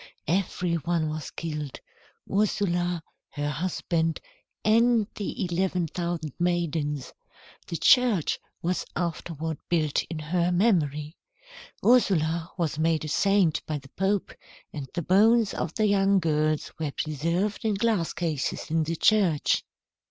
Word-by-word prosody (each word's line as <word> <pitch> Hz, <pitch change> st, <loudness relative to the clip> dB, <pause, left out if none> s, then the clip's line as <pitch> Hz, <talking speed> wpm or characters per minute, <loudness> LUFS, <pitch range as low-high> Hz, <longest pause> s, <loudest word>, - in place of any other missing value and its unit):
Every 175 Hz, 0 st, 0 dB
one 165 Hz, 0 st, -1 dB
was 155 Hz, -1 st, -5 dB
killed, 150 Hz, -4 st, -5 dB, 0.5 s
Ursula, 175 Hz, -4 st, 0 dB, 0.3 s
her 145 Hz, 0 st, -2 dB
husband, 165 Hz, 0 st, -1 dB, 0.5 s
and 230 Hz, 0 st, +4 dB
the 205 Hz, +1 st, -3 dB
eleven 180 Hz, 0 st, 0 dB
thousand 170 Hz, -3 st, -3 dB
maidens. 160 Hz, -5 st, -1 dB, 0.5 s
The 170 Hz, -, -3 dB
church 240 Hz, -, +4 dB, 0.2 s
was 175 Hz, +2 st, 0 dB
afterward 165 Hz, -2 st, -3 dB
built 155 Hz, -4 st, +2 dB
in 165 Hz, -, -6 dB
her 170 Hz, +3 st, 0 dB
memory. 160 Hz, -6 st, +1 dB, 0.7 s
Ursula 170 Hz, -9 st, +3 dB
was 155 Hz, -3 st, -1 dB
made 160 Hz, -1 st, +1 dB
a -, -, -4 dB
saint 195 Hz, -2 st, +2 dB
by 155 Hz, -, -1 dB
the 135 Hz, -1 st, -12 dB
Pope, 195 Hz, +5 st, -1 dB, 0.4 s
and 140 Hz, -4 st, -6 dB
the 175 Hz, -, -1 dB
bones 215 Hz, +5 st, +4 dB
of 165 Hz, -, -3 dB
the 215 Hz, -, +2 dB
young 200 Hz, -1 st, +3 dB
girls 155 Hz, -3 st, 0 dB
were 155 Hz, -2 st, -1 dB
preserved 170 Hz, +9 st, -1 dB
in 215 Hz, -2 st, +1 dB
glass 210 Hz, -5 st, +1 dB
cases 155 Hz, -4 st, -3 dB
in 165 Hz, 0 st, +2 dB
the 160 Hz, +2 st, -1 dB
church." 185 Hz, -5 st, +3 dB
170 Hz, 130 wpm, -27 LUFS, 155-195 Hz, 0.7 s, and